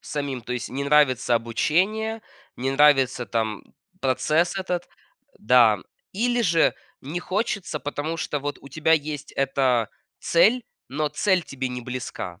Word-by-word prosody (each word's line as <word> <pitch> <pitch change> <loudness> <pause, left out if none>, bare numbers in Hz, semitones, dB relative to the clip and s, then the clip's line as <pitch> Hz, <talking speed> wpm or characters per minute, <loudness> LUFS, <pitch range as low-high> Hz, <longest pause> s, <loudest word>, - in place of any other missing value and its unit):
самим, 140 -4 -4
то 125 - -5
есть 125 -1 -4
не 140 +2 -4
нравится 135 -4 +3
обучение, 190 - 0 0.4
не 130 +2 -1
нравится 135 -3 +4
там 110 0 -2 0.4
процесс 155 +7 +1
этот. 180 -2 -3 0.5
Да. 110 -3 +5 0.3
Или 240 +4 +1
же 165 -4 +3 0.3
не 150 +6 -4
хочется, 195 -6 -2
потому 145 +3 -3
что 150 - -2
вот 145 +1 -4
у 140 - -12
тебя 155 +3 +1
есть 150 -2 -1
эта 130 -4 +1 0.3
цель, 225 +9 +3 0.3
но 150 +3 -1
цель 180 +4 +1
тебе 130 -3 -4
не 125 0 -5
близка. 120 -7 -6
145 Hz, 140 wpm, -24 LUFS, 125-170 Hz, 0.5 s, Да